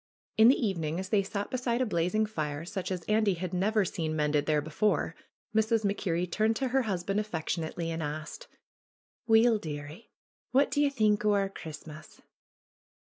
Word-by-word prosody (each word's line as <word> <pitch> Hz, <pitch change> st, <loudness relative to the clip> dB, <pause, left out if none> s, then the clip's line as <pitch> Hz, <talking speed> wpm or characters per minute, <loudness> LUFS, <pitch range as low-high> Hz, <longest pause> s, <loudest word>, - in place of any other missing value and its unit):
In 220 Hz, +1 st, +7 dB
the 260 Hz, -, +7 dB
evening, 170 Hz, -, -1 dB
as 190 Hz, 0 st, -5 dB
they 210 Hz, -2 st, +3 dB
sat 200 Hz, +1 st, -4 dB
beside 250 Hz, -2 st, 0 dB
a 255 Hz, -, +2 dB
blazing 215 Hz, +2 st, +1 dB
fire 155 Hz, -7 st, -4 dB
such 190 Hz, +1 st, -4 dB
as 180 Hz, -2 st, -3 dB
Andy 215 Hz, -1 st, +2 dB
had 180 Hz, +1 st, -5 dB
never 205 Hz, +3 st, +2 dB
seen 160 Hz, -3 st, -3 dB
mended 150 Hz, -1 st, +1 dB
there 155 Hz, -1 st, +3 dB
before, 160 Hz, +3 st, 0 dB, 0.4 s
Mrs. 220 Hz, 0 st, +2 dB
Mac 200 Hz, 0 st, 0 dB
Kerrie 175 Hz, -2 st, -1 dB
turned 215 Hz, +5 st, +1 dB
to 265 Hz, +2 st, -1 dB
her 265 Hz, +2 st, +2 dB
husband 195 Hz, -2 st, -1 dB
affectionately 165 Hz, -4 st, -3 dB
and 165 Hz, 0 st, -3 dB
asked: 150 Hz, +1 st, -5 dB, 0.8 s
^^Weel, 225 Hz, -1 st, +5 dB
dearie, 150 Hz, +5 st, -7 dB, 0.4 s
wha' 270 Hz, +2 st, +6 dB
dae 290 Hz, -, 0 dB
ye 290 Hz, -, +4 dB
think 215 Hz, -6 st, +2 dB
o' 210 Hz, -1 st, +3 dB
our 195 Hz, -1 st, +1 dB
Christmas?" 155 Hz, -3 st, -10 dB
195 Hz, 175 wpm, -29 LUFS, 160-220 Hz, 0.8 s, In